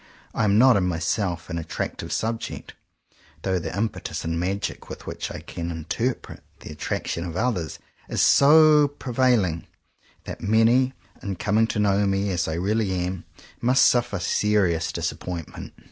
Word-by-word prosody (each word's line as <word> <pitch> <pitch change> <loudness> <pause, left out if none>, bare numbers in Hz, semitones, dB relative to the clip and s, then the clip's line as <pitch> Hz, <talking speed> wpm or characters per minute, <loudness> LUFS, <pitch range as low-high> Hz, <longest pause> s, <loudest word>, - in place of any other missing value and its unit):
I 115 - +1
am 100 0 +3
not, 125 -1 +6
in 95 - +1
myself, 85 +1 -1
an 85 - -3
attractive 80 - -5
subject; 115 +1 -3 0.7
though 95 -1 0
the - - -5
impetus 110 -5 -3
and 80 0 -1
magic 95 +3 -3
with - - -9
which - - -5
I - - -7
can 85 0 -6
in 80 -2 -6
terpret 120 +9 -3 0.2
the - - -9
attraction 75 +2 -3
of 85 -2 -6
others 100 -7 -1 0.3
is - - -2
so 150 +1 +6
pre 140 -3 -8
vailing, 115 -10 +2 0.6
that - - -8
many, 115 +5 +3 0.3
in 100 -1 -4
coming 110 +3 +1
to 115 - -3
know 100 -1 +2
me 100 +1 0
as 85 -2 -1
I 80 - -2
really 100 +3 0
am, 90 0 -3 0.4
must 130 +2 +4
suffer 120 -4 +2
serious 95 -4 +1
dis - - -2
appointment. 85 -3 -7
100 Hz, 160 wpm, -24 LUFS, 85-115 Hz, 0.7 s, not